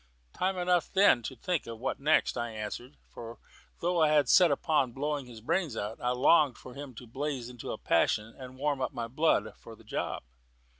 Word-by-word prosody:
"Time 185 +1 -1
enough 180 -1 +1
then 195 -10 +5
to 130 - -6
think 175 +4 -2
of 115 -1 -6
'what 125 +4 -3
next,'" 150 +3 +2
I 120 -1 -2
answered; 110 +5 -7
for 115 0 -9 0.4
though 175 0 +1
I 155 -1 +4
was 140 -4 +3
set 180 -2 +7
upon 140 -3 +1
blowing 145 0 -3
his 115 -3 -11
brains 140 - -1
out, 105 +2 -4
I 125 - 0
longed 140 +2 +4
for 125 - -11
him 140 -2 -9
to 125 - -10
blaze 130 0 -4
out - - -9
into 120 -2 -7
a - - -4
passion 110 +2 +1
and 130 -1 -10
warm 140 0 -1
up 130 - -2
my 115 -1 -4
blood 150 +7 +1
for - - -12
the - - -19
job. - - -4
135 Hz, 210 wpm, -30 LUFS, 120-155 Hz, 0.4 s, set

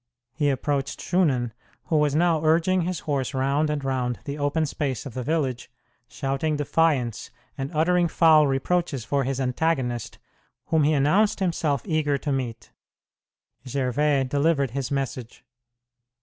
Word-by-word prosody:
He 145 0 +1
approached 140 0 -1
Shunan, 140 -10 +1 0.3
who 160 - -2
was 150 -1 +2
now 165 -1 +2
urging 170 +4 +3
his 175 -1 -3
horse 135 -3 -2
round 140 +3 +1
and 150 -2 -2
round 125 -2 -1
the 140 - -4
open 145 +2 0
space 140 -4 -3
of 135 - -7
the 130 - -4
village, 135 -3 -2 0.4
shouting 135 +4 -2
defiance 145 -6 0 0.3
and 135 0 -4
uttering 175 +2 +2
foul 160 -3 +5
reproaches 140 -1 -1
for 140 +3 0
his 135 0 -2
antagonist, 130 -3 -1 0.5
whom 160 -1 +3
he 155 - +3
announced 155 +11 +2
himself 160 -7 0
eager 150 -3 +1
to 145 - -3
meet. 130 -4 -4 1.0
Gervais 135 +2 +1
delivered 140 0 +1
his 135 0 -3
message. 130 -4 -4
145 Hz, 140 wpm, -25 LUFS, 135-160 Hz, 1.0 s, foul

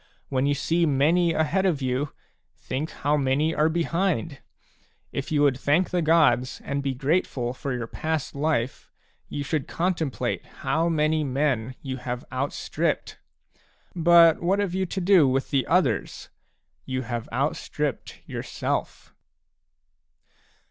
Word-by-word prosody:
When 135 +1 +1
you 145 - +2
see 165 +4 +1
many 160 +5 +3
ahead 160 +4 +1
of 175 -7 +1
you, 130 +2 -1 0.4
think 145 +5 -4
how 145 +2 0
many 140 +3 +1
are 155 0 +2
behind! 170 -2 -1 0.7
If 140 - -4
you 145 -1 +3
would 135 -3 +3
thank 150 +7 +2
the 180 - +1
gods, 150 -6 +3
and 140 0 -2
be 135 -1 -2
grateful 135 -3 0
for 135 +1 -5
your 120 -2 -2
past 155 +5 -3
life, 140 -4 -1 0.4
you 145 - -3
should 150 -1 -2
contemplate 165 -5 -1 0.2
how 160 +5 +2
many 155 -1 +1
men 130 -3 -1
you 130 -1 -4
have 125 -1 -5
outstripped. 135 +2 -2 0.8
But 170 -1 +6
what 185 +3 +2
have 200 -3 -1
you 190 0 -1
to 190 - -3
do 180 -5 +5
with 135 +1 0
the 135 -4 +1
others? - - 0 0.5
You 130 0 -3
have 120 -1 -4
out 135 +6 0
stripped 150 -5 -4
yourself. - - -4
145 Hz, 140 wpm, -25 LUFS, 130-165 Hz, 0.8 s, But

